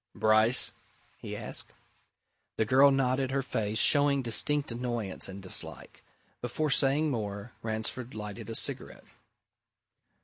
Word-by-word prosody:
"Bryce?" 110 +3 +4 0.5
he - - -7
asked. - - -2 0.8
The 110 - +1
girl 135 +5 +5
nodded 135 -1 0
her 135 +1 -1
face 110 -3 -2
showing 145 0 +3
distinct 140 +5 +1
annoyance 120 -6 -2
and 95 0 -9
dislike. 95 - -5 0.4
Before 145 +5 -2
saying 145 +3 +3
more, 105 -2 -5
Ransford 110 +2 -3
lighted 105 +1 -7
a 115 - -4
cigarette. - - -1
120 Hz, 115 wpm, -29 LUFS, 110-135 Hz, 0.8 s, girl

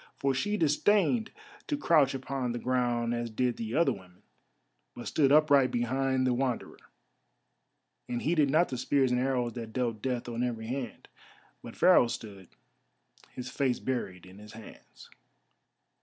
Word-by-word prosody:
For 135 -1 0
she 205 +11 -1
disdained 205 - +2 0.4
to 295 - -1
crouch 150 - +3
upon 130 -2 -3
the - - -3
ground 120 -2 0
as 120 0 -3
did 120 +2 -1
the 115 0 -4
other 170 +1 +3
women, 90 -2 -15 0.7
but 120 - -8
stood 140 -3 +2
upright 145 -3 +5
behind 130 +2 0
the 125 - +2
Wanderer, 125 -1 -2 1.3
and 120 -1 -3
heeded 155 -3 +2
not 160 +5 +3
the 125 - -4
spears 130 0 +1
and 125 0 +1
arrows 125 -3 -1
that 115 -2 -7
dealt 120 -4 -2
death 125 -1 -2
on 120 0 -4
every 115 -3 -3
hand. 125 0 -5 0.5
But - - -10
Pharaoh 120 - +5
stood, 100 -5 -8 0.9
his 125 0 -7
face 130 -3 0
buried 95 -9 -4
in 95 +2 -14
his 105 0 -13
hands. 110 -1 -14
125 Hz, 155 wpm, -29 LUFS, 120-135 Hz, 1.3 s, upright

